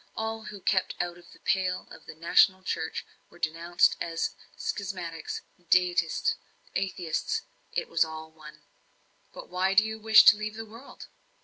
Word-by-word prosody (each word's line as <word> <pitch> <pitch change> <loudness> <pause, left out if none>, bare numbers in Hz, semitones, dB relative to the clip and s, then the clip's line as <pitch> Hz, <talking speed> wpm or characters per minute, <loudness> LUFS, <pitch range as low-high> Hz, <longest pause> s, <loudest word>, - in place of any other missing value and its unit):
All 220 0 -3
who 205 -2 -8
kept 185 0 +1
out 175 0 -3
of 175 - -18
the - - -16
pale 185 -1 0
of - - -13
the - - -9
national 185 +3 +4
church - - -3 0.2
were - - -17
denounced 170 +2 +2
as 165 -1 -2 0.2
schismatics, 180 -5 -4 0.3
deists, 180 - +2 0.4
atheists 180 -4 -2 0.3
it - - -2
was 165 0 +3
all 160 0 -8
one. 155 -1 -14 0.7
"But - - -10
why 185 +2 +1
do 210 - +7
you 220 0 -5
wish 220 0 +8
to 210 - +9
leave 215 0 -4
the 225 0 -6
world?" 230 +5 -12
180 Hz, 155 wpm, -28 LUFS, 165-210 Hz, 0.7 s, to